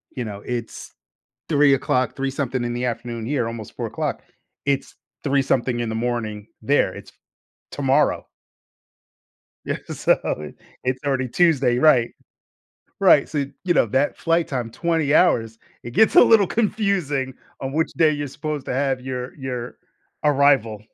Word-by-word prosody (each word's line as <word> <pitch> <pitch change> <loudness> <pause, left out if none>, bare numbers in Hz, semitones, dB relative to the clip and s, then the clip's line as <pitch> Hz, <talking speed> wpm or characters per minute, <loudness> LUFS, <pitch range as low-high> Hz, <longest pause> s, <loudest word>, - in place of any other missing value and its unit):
you 125 -3 -3
know, 100 -2 -7
it's 120 -2 -6 0.6
03:00, 140 -3 +2
three-something 135 -2 -2
in 120 0 -2
the 125 +1 -2
afternoon 120 -1 -4
here, 125 -3 -1
almost 115 -2 -7
04:00. - - -3 0.4
It's 140 -1 -1 0.3
three-something 135 -3 +1
in 120 -1 -2
the 110 - -3
morning 110 -3 -3
there, 110 -6 +2
it's - - -11 0.6
tomorrow. 140 +1 +1 1.4
Yeah, - - -2 0.2
so - - +3 0.3
it 75 -1 -9 0.3
it's 130 0 -1
already 130 -2 0
Tuesday, 135 -6 +3
right. 125 -5 +4 0.9
Right. - - +5
So, 145 -2 -1 0.2
you 180 -2 +2
know, - - +4
that 135 +6 0
flight 165 0 +1
time, 125 -4 -3
20 165 -3 0
hours, 115 -10 +3 0.3
it 120 - -7
gets 220 - +4
a - - +10
little 210 -5 +5
confusing 195 - 0 0.3
on 135 0 -3
which 160 +1 0
day 160 -2 +4
you're 145 -1 -3
supposed 150 0 -5
to - - -3
have 135 -1 0
your 125 -1 -5
your 125 -3 -5 0.5
arrival. 135 -7 +3
135 Hz, 145 wpm, -22 LUFS, 120-145 Hz, 1.4 s, a